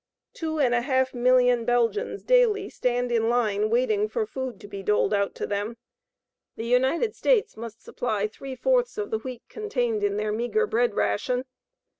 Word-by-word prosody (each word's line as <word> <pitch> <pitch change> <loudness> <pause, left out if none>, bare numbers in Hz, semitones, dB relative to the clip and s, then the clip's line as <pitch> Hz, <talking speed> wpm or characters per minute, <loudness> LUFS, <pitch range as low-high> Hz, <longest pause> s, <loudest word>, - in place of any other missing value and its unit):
Two 315 -1 -3
and 255 -4 +3
a 240 - +2
half 260 0 +1
million 245 -1 +3
Belgians 245 - 0
daily 460 -5 +3
stand 245 0 -1
in 230 -1 +2
line 215 -3 +1
waiting 220 -3 +1
for 220 - -1
food 260 +2 -5
to - - -10
be 200 -1 -7
doled 210 +2 +1
out 200 -1 0
to - - -3
them. 205 +3 -3 0.8
The 225 - -5
United 265 - +2
States 480 -5 +2
must 225 0 -9
supply 215 -4 -2
three 260 +5 -7
fourths - - +1
of 420 -1 -3
the 220 - 0
wheat 250 0 -8
contained 245 - -2
in 205 0 +1
their 210 0 -1
meagre 240 - 0
bread 450 +3 +1
ration. 250 0 0
245 Hz, 175 wpm, -26 LUFS, 220-280 Hz, 0.8 s, and